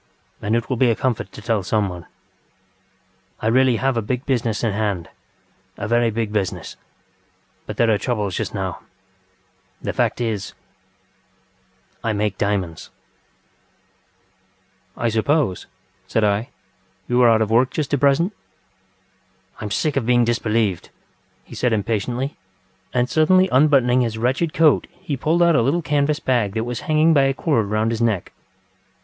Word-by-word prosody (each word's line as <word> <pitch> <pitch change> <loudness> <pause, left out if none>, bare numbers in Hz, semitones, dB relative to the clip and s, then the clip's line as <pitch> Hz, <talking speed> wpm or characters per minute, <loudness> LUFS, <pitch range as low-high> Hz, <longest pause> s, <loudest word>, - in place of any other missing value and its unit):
And 110 +2 0
it 115 0 -1
will 130 - -2
be 125 0 +3
a 115 - +2
comfort 115 -7 -2
to 110 - -11
tell 110 -2 0
someone. 95 -3 -2 1.3
I - - -6
really 125 +2 +4
have 135 +2 0
a - - +1
big 125 +5 -3
business 120 -5 -1
in 115 - +1
hand, 100 -5 -2 0.7
a 105 - -4
very 120 +1 +2
big 110 -1 -3
business. 100 -4 -3 0.9
But - - -6
there 115 -1 +3
are 105 - +2
troubles 105 -5 -2
just - - -3
now. - - -3 1.0
The - - -4
fact - - 0
is.... 110 -4 -3 1.5
I 115 -2 0
make 105 -2 -2
diamonds. 95 -5 -2 2.1
ŌĆØ - - -6
ŌĆ£I 115 - +2
suppose, 115 - 0
ŌĆØ - - -32 0.4
said 110 - +2
I, 105 +5 +1 0.6
ŌĆ£you 125 0 +1
are 120 -1 +6
out 110 -1 +4
of 110 - -4
work 125 +3 +4
just 155 -4 -3
at 145 - +2
present? 145 +8 +2
ŌĆØ 95 - -35
ŌĆ£I - - -10
am 105 - -4
sick 140 +8 -1
of 120 -4 -1
being 120 -1 +4
disbelieved, 110 -5 0
ŌĆØ - - -31
he - - -11
said 125 -2 0
impatiently, 115 +6 -2 0.5
and 125 0 +1
suddenly 185 +6 +4
unbuttoning 130 -3 +4
his 115 -2 -1
wretched 130 +8 0
coat 160 -4 +4
he 145 - -5
pulled 160 +6 +1
out 170 -2 +4
a 120 - +4
little 145 +8 +1
canvas 150 0 +1
bag 120 -6 0
that 110 - 0
was 120 0 -4
hanging 155 +1 +4
by 140 -3 +4
a 135 0 +1
cord 125 -11 0
round 110 +2 0
his 115 0 -3
neck. 110 -6 0
115 Hz, 165 wpm, -21 LUFS, 105-135 Hz, 2.1 s, are